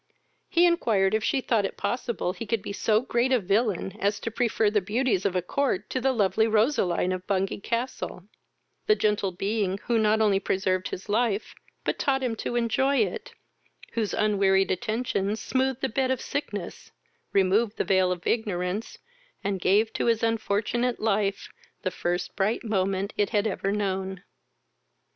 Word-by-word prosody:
He 345 +1 +4
inquired 220 - +2
if 220 0 +1
she 270 - +1
thought 230 -4 +1
it 195 - -4
possible 235 -7 -2
he 230 +2 -7
could 220 -1 -1
be - - -5
so 215 +1 +2
great 245 0 0
a 255 - +5
villain 200 -1 0
as 205 +1 0
to 230 - -3
prefer 225 -2 +1
the 210 -1 +2
beauties 210 0 0
of 190 - -3
a 180 - +1
court 210 -2 -1
to 260 - -1
the 265 - +3
lovely 220 -2 +2
Roseline 215 - +2
of 185 0 -4
Bungay 195 -1 0
castle, 230 -4 -3 0.6
the 425 - +5
gentle 210 - +1
being 195 +1 -1
who 235 -2 +1
not 215 0 +3
only 205 -3 +3
preserved 185 -1 0
his 185 - -7
life, 215 -1 0 0.3
but - - -2
taught 270 -1 +1
him 240 -3 -1
to 240 - -3
enjoy 240 +4 +2
it, - - -1 0.6
whose 220 -3 -1
unwearied 195 -2 +3
attentions 215 +1 -1
smoothed 265 0 -1
the 265 - +1
bed 260 +2 0
of 260 -2 0
sickness, 205 -10 -5 0.4
removed 200 +3 +2
the - - +1
veil 190 -1 +3
of 175 -1 -4
ignorance, 200 -2 -1 0.5
and 195 -2 -2
gave 215 +5 +3
to - - -1
his 230 -1 +2
unfortunate 230 +2 0
life 205 -2 0 0.4
the 185 - 0
first 175 0 -2
bright 205 +3 0
moment 195 -2 -1
it 205 - +2
had 210 -2 +1
ever 195 -2 -1
known. 190 -2 -2
210 Hz, 170 wpm, -26 LUFS, 195-235 Hz, 0.6 s, a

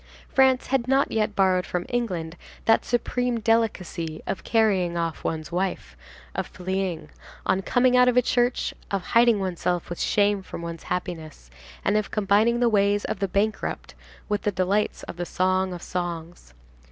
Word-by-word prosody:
France 265 -1 +4
had 260 -2 0
not 270 +2 +2
yet 215 -1 0
borrowed 185 -2 +3
from 180 -1 -3
England 180 -10 -2 0.3
that 225 - +4
supreme 245 0 0
delicacy 205 -8 0
of 190 - -4
carrying 195 -6 +2
off 165 -1 -2
one's 160 0 -3
wife, 180 - -2 0.4
of - - -3
fleeing, 185 -1 -3 0.4
on 190 - +2
coming 250 +5 +3
out 250 0 +6
of 250 0 +5
church, 245 +1 +1 0.2
of 195 -2 -1
hiding 235 0 +4
oneself 180 -2 -2
with 175 - -5
shame 205 -1 +2
from 175 -2 -8
one's 170 -1 -6
happiness, 160 - -5 0.3
and 205 - +3
of 215 - -1
combining 215 +3 +2
the 245 - +3
ways 205 -2 +2
of - - -4
a 195 - +1
bankrupt 205 +3 -2 0.3
with 210 -1 -1
the 205 - 0
delights 195 +3 0
of - - -8
the 175 - -2 0.2
Song 185 0 +2
of 175 -1 -7
Songs. 170 - -5
195 Hz, 165 wpm, -25 LUFS, 175-225 Hz, 0.4 s, out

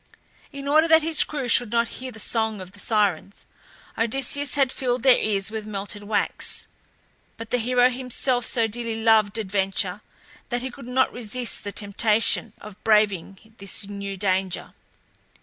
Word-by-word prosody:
In 280 -1 -7
order 310 +3 +4
that 320 -1 +5
his 320 0 +5
crew 285 -4 -4
should 240 -1 +4
not 235 -1 +1
hear 255 0 -6
the 220 - -12
song 220 -2 0
of 185 -1 -9
the 205 - -12
Sirens, 200 -3 -1 0.5
Odysseus 270 +5 -1
had 270 -3 +2
filled 250 -3 -2
their 260 -2 +6
ears 205 -1 0
with 220 -1 -5
melted 205 0 -5
wax; 210 +1 -1 0.7
but 225 0 -9
the 245 - +2
hero 245 +2 +3
himself 250 0 -1
so 230 -1 +1
dearly 225 0 -3
loved 220 -2 +3
adventure 195 -2 0 0.5
that 245 -1 -2
he 260 - -4
could 245 -1 -11
not 260 +1 +1
resist 245 +1 -3
the 205 - -5
temptation 210 +2 +1
of 210 -1 -13
braving 210 -1 +1
this 200 +1 -3
new 200 -1 -6
danger. 190 -1 -1
225 Hz, 160 wpm, -24 LUFS, 205-250 Hz, 0.7 s, their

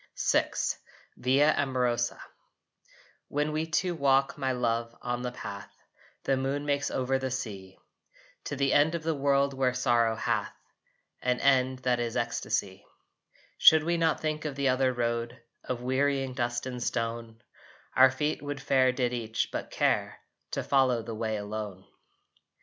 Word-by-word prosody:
VI - - +3 0.7
VIA 140 +4 +3
AMOROSA 125 -3 0 1.1
When 150 +1 -1
we 155 +1 -1
two 175 +2 0
walk, 135 -3 +2
my 135 -1 -1
love, 115 -2 -1
on 120 0 -3
the 125 0 -3
path 100 -5 -8 0.5
The 135 - +2
moon 135 +2 -2
makes 145 -1 0
over 130 +1 0
the 130 0 -2
sea, 100 -7 -6 0.7
To - - -3
the 140 0 +1
end 155 +3 +4
of 165 - -4
the 165 0 0
world 140 -1 +2
where 130 -2 0
sorrow 120 -3 +2
hath - - -1 0.7
An 125 0 0
end 130 -1 +3
that 125 -1 +2
is 120 -1 -2
ecstasy, 110 -4 -2 0.8
Should 160 0 +8
we 170 +2 +1
not 165 -2 +1
think 155 0 -2
of 150 -3 -4
the 140 -1 +1
other 130 0 +2
road 120 0 -2 0.2
Of 125 -1 -4
wearying 135 +1 0
dust 120 -1 -2
and 125 -1 -5
stone 115 -1 -3 0.5
Our 130 0 +8
feet 150 +3 -2
would 145 -1 -5
fare 130 -2 +3
did 125 -1 -1
each 115 -2 -2
but - - -4
care - - 0 0.4
To - - -1
follow 130 -4 +2
the 115 - -6
way 110 0 -2
alone? 105 -2 -6
130 Hz, 155 wpm, -28 LUFS, 120-140 Hz, 1.1 s, Should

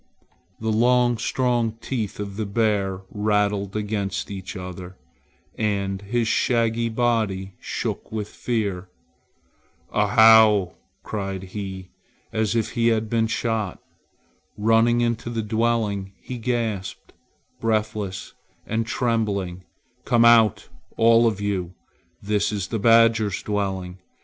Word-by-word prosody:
The 110 0 -1
long 120 +1 +3
strong 120 -3 0
teeth 115 -3 -4
of 100 -1 -5
the 110 0 -3
bear 100 -3 0
rattled 105 -1 0
against 105 -2 -3
each 95 +1 -7
other, 90 0 -8 0.6
and 100 -3 -1
his 115 +3 -1
shaggy 115 -1 +1
body 110 -5 0
shook - - -4
with 110 -2 -3
fear. 100 -8 -3 1.0
"Ahow!" 105 -3 +6 0.3
cried 95 -3 -4
he, 95 -2 -6 0.4
as 110 0 0
if 115 -2 0
he 115 -1 +1
had 110 -1 +1
been 115 -1 +2
shot. 110 -4 -2 0.8
Running 115 +2 +3
into 120 0 -1
the 115 -2 -2
dwelling 110 -3 -1
he 125 -1 -7
gasped, 110 -5 -3 0.5
breathless 110 -3 -2 0.3
and 110 +1 -2
trembling, 105 -7 -1 0.4
"Come 120 -3 +3
out, 115 -3 +5 0.3
all 115 +1 +5
of 105 -3 -1
you! 95 -3 -2 0.5
This 105 +1 0
is 100 -3 -3
the 115 - -2
badger's 115 -2 +4
dwelling. 95 -3 -3
110 Hz, 115 wpm, -23 LUFS, 100-115 Hz, 1.0 s, Ahow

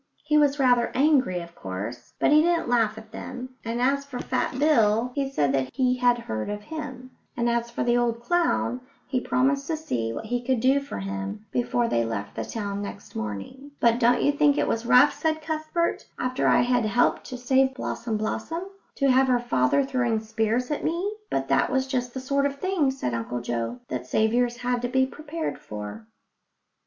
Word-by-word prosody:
He 300 0 +1
was 290 -1 +4
rather 245 -3 +3
angry, 260 - +3
of 170 0 -11
course, 105 - -6
but - - +3
he 305 +1 +7
didn't 340 -2 +1
laugh 225 -3 +2
at 220 0 -11
them, 255 0 -7
and 230 +1 -3
as 275 +3 +2
for 280 -3 -7
Fat 255 - -2
Bill, 240 -5 +3
he 275 0 -1
said 145 - +1
that 135 -1 0
he 255 -1 +2
had 245 -1 +3
heard 110 - -4
of 205 0 -4
him; 260 -3 -7 0.3
and 235 0 +1
as 235 0 0
for 235 - -2
the 240 0 +2
old 235 -1 +1
clown, 295 -3 0 0.2
he 260 - -1
promised 275 +3 +1
to 320 - -1
see 115 - -2
what 220 - -5
he 245 +2 -2
could 255 -1 +1
do 265 +4 +4
for 280 - -7
him 95 - -5
before 240 -1 +1
they 115 - +1
left 100 -3 -4
the - - -2
town 200 -2 -4
next 200 0 -8
morning. 110 - -6
"But 235 0 +3
don't 245 0 +3
you 285 - +4
think 290 0 +3
it - - +1
was 230 +1 -1
rough," 255 +5 +6
said 315 -1 -1
Cuthbert, 315 +2 -2
"after 255 0 0
I - - +5
had 245 -1 +2
helped 230 +3 +2
to 255 - -6
save 265 +1 +2
Blossom 235 -4 -3
blossom, 225 +10 -3 0.3
to 275 -2 +3
have 260 +1 +4
her 250 -1 +4
father 240 - +2
throwing 245 -4 0
spears 225 +4 -1
at 295 - -2
me?" 350 +6 -1 0.2
But - - -1
that - - +3
was 265 0 +1
just 250 -2 -3
the - - -2
sort 280 +2 +1
of 280 - -5
thing, 370 -7 +1
said 265 - -3
Uncle 115 +1 -3
Joe, 120 0 -3
that 125 0 -4
saviours 235 - +1
had 245 0 -1
to 245 - -1
be 260 +1 +2
prepared 305 +4 -5
for. 105 +1 -8
245 Hz, 205 wpm, -25 LUFS, 215-275 Hz, 0.3 s, he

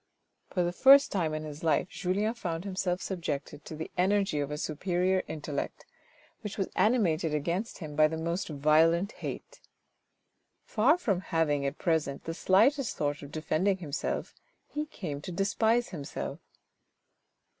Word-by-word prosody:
For 180 - 0
the 175 - 0
first 275 +9 +7
time 170 -6 0
in 155 - -4
his 150 0 -8
life 165 +2 +2
Julien 200 +5 -1
found 175 -8 -4
himself 185 -2 -1
subjected 150 -5 -4
to 155 - -7
the 160 +1 -6
energy 195 -4 +2
of 145 -1 -1
a 150 - -3
superior 180 +5 0
intellect, 150 -2 -4 0.6
which 210 - -5
was 195 - -1
animated 175 -9 +2
against 175 +9 -2
him 155 -4 -7
by 155 0 +6
the 160 +1 -4
most 170 +4 -2
violent 160 +6 +3
hate. - - -7 1.0
Far 255 +10 +3
from 200 - 0
having 150 -6 0
at 140 - -4
present 160 -5 0
the 165 - -4
slightest 240 - +3
thought 145 -1 -1
of 145 -1 -9
defending 170 +5 0
himself, 155 -6 -3 0.3
he 300 +1 -4
came 150 - -6
to 180 - -6
despise 220 +6 +1
himself. 150 -6 -5
170 Hz, 150 wpm, -29 LUFS, 155-195 Hz, 1.0 s, first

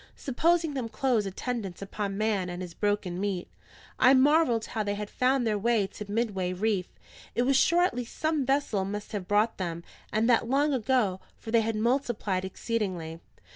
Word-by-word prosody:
Supposing 325 +4 +1
them 255 -4 -3
close 240 -4 +1
attendants 195 -2 -4
upon 195 0 -4
man 205 -4 0
and 175 +1 -5
his 175 -2 -8
broken 205 -2 -1
meat, 195 -3 -2 0.5
I 260 +2 +7
marvelled 260 -4 +4
how 220 - -3
they 205 -1 -1
had 210 0 -6
found 255 0 +2
their 210 -2 +1
way 225 -1 +2
to 205 +1 -9
Midway 205 -5 -1
reef; 195 -1 0 0.5
it 240 - +2
was 270 +2 +2
sure 340 +6 +4
at 360 - +2
least 245 -1 -6
some 310 -2 +1
vessel 270 -7 +1
must 205 +2 -5
have 200 -4 -4
brought 210 +2 +2
them, 170 -2 -3 0.3
and 220 +2 +2
that 235 -1 +3
long 285 +3 +2
ago, 240 -6 +1 0.2
for 225 - -8
they 230 -1 +5
had 225 0 -1
multiplied 220 -5 0
exceedingly. 185 -5 -3
220 Hz, 180 wpm, -28 LUFS, 195-250 Hz, 0.5 s, I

